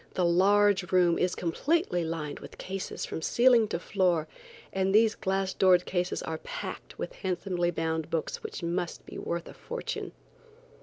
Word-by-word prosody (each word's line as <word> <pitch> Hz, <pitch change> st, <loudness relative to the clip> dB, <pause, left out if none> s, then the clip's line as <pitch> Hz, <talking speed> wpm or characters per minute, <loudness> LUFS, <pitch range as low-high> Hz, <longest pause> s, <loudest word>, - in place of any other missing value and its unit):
The 180 Hz, -, +2 dB
large 195 Hz, +1 st, +4 dB
room 175 Hz, -2 st, +4 dB
is 180 Hz, 0 st, +1 dB
completely 180 Hz, -, 0 dB
lined 160 Hz, -3 st, -4 dB
with -, -, -11 dB
cases 190 Hz, 0 st, -4 dB
from -, -, -5 dB
ceiling 240 Hz, +2 st, +5 dB
to 170 Hz, -, -2 dB
floor, 175 Hz, -3 st, +1 dB, 0.5 s
and 190 Hz, +1 st, +1 dB
these 220 Hz, 0 st, +5 dB
glass 190 Hz, 0 st, -1 dB
doored 180 Hz, -2 st, +4 dB
cases 180 Hz, -1 st, -1 dB
are 160 Hz, -1 st, -4 dB
packed -, -, -7 dB
with -, -, -5 dB
handsomely 180 Hz, -2 st, -1 dB
bound 160 Hz, -1 st, -2 dB
books 165 Hz, -, -2 dB
which 440 Hz, -, -6 dB
must 170 Hz, 0 st, -2 dB
be -, -, -8 dB
worth 170 Hz, 0 st, -3 dB
a -, -, -10 dB
fortune. 485 Hz, 0 st, -5 dB
180 Hz, 160 wpm, -29 LUFS, 170-200 Hz, 0.5 s, ceiling